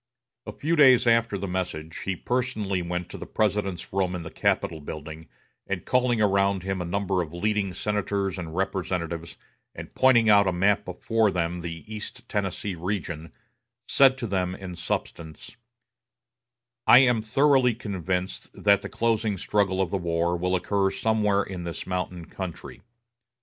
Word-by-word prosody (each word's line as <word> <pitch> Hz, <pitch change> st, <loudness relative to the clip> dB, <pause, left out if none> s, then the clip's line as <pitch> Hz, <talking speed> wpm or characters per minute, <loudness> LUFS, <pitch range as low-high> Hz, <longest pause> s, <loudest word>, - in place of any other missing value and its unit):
A -, -, -3 dB
few 165 Hz, +3 st, -1 dB
days 130 Hz, -5 st, +6 dB
after 115 Hz, -3 st, +3 dB
the 100 Hz, +1 st, -4 dB
message, 85 Hz, -3 st, -4 dB
he 95 Hz, -, -2 dB
personally 110 Hz, -4 st, -1 dB
went 90 Hz, 0 st, -3 dB
to 100 Hz, -, -8 dB
the 90 Hz, -, -7 dB
President's 100 Hz, -4 st, -1 dB
room 95 Hz, -2 st, 0 dB
in 85 Hz, -, -5 dB
the 80 Hz, -, -8 dB
Capitol 80 Hz, -, 0 dB
building, 80 Hz, +2 st, -8 dB, 0.4 s
and 95 Hz, -3 st, -3 dB
calling 125 Hz, -2 st, +2 dB
around 100 Hz, -2 st, +2 dB
him 95 Hz, -1 st, -2 dB
a -, -, -3 dB
number 95 Hz, +1 st, 0 dB
of 85 Hz, -1 st, -6 dB
leading 105 Hz, +1 st, 0 dB
senators 100 Hz, 0 st, -2 dB
and 80 Hz, -2 st, -6 dB
representatives, 85 Hz, -3 st, -3 dB, 0.4 s
and -, -, -9 dB
pointing 125 Hz, -4 st, +5 dB
out 100 Hz, -2 st, +6 dB
on 90 Hz, -, 0 dB
a -, -, -5 dB
map 105 Hz, +2 st, +2 dB
before 110 Hz, +4 st, +1 dB
them 85 Hz, -1 st, -2 dB
the 85 Hz, -1 st, -6 dB
East 110 Hz, -1 st, -8 dB
Tennessee 100 Hz, -1 st, -2 dB
region, 85 Hz, -3 st, -4 dB, 0.6 s
said 135 Hz, -1 st, +5 dB
to 125 Hz, -, -4 dB
them 95 Hz, -3 st, -1 dB
in 95 Hz, -2 st, -8 dB
substance: 80 Hz, +1 st, -5 dB, 1.3 s
I 120 Hz, -, +9 dB
am 125 Hz, -4 st, +5 dB
thoroughly 130 Hz, +1 st, +3 dB
convinced 95 Hz, -4 st, -3 dB
that 100 Hz, -1 st, +3 dB
the -, -, -6 dB
closing 110 Hz, -3 st, 0 dB
struggle 95 Hz, 0 st, 0 dB
of 95 Hz, -3 st, 0 dB
the 100 Hz, -, +1 dB
war 85 Hz, 0 st, 0 dB
will 90 Hz, +2 st, 0 dB
occur 95 Hz, +2 st, +1 dB
somewhere 105 Hz, -2 st, +1 dB
in 95 Hz, -3 st, -6 dB
this 85 Hz, -1 st, -5 dB
mountain 90 Hz, -2 st, -3 dB
country. 95 Hz, -1 st, -7 dB
95 Hz, 160 wpm, -26 LUFS, 90-105 Hz, 1.3 s, I